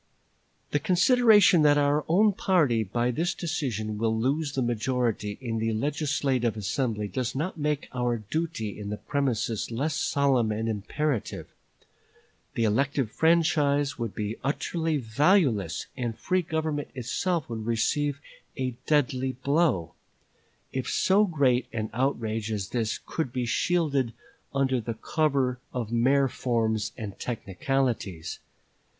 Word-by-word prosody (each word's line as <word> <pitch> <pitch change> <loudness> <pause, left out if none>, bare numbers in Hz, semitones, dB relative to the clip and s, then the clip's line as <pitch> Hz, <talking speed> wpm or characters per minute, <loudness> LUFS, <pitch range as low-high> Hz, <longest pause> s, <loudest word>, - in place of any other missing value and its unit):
"The 145 - +2
consideration 205 - +5
that 145 -1 +5
our 145 +1 +2
own 200 +5 +4
party 150 - +2
by 120 +5 0
this 165 +7 -1
decision 115 - -3
will 110 0 +1
lose 140 +5 0
the 130 - 0
majority 120 -3 -1
in 115 -4 -3
the 115 0 0
legislative 135 -2 0
assembly 105 +1 -1
does 125 +5 -3
not 160 +4 -3
make 150 -1 -1
our 120 -1 0
duty 110 - -3
in 100 -1 -5
the 105 - -3
premises 125 -6 -1
less 140 +7 -1
solemn 140 -6 +2
and 110 +1 -2
imperative. 115 +5 -2 1.1
The 115 - +1
elective 130 +2 +1
franchise 150 -4 +2
would 115 -3 -3
be 105 +1 -3
utterly 160 +3 -1
valueless, 125 - +2
and 120 -3 -3
free 185 +1 +1
government 155 -3 -2
itself 150 +6 -1
would 110 -2 -5
receive 140 +5 0 0.4
a 130 -2 -1
deadly 130 -3 +1
blow, 130 - +1 0.8
if 130 -1 -2
so 200 +3 +3
great 130 -7 +2
an 110 -2 -3
outrage 115 -4 -1
as 100 -3 -3
this 115 -3 -1
could 160 -7 -3
be 125 -1 -2
shielded 140 -3 +1 0.4
under 130 -2 +1
the 115 +1 -4
cover 135 -1 0
of 115 -3 -4
mere 135 +4 +3
forms 110 -4 -1
and 105 -5 -7
technicalities. 115 - -2
130 Hz, 130 wpm, -27 LUFS, 110-150 Hz, 1.1 s, consideration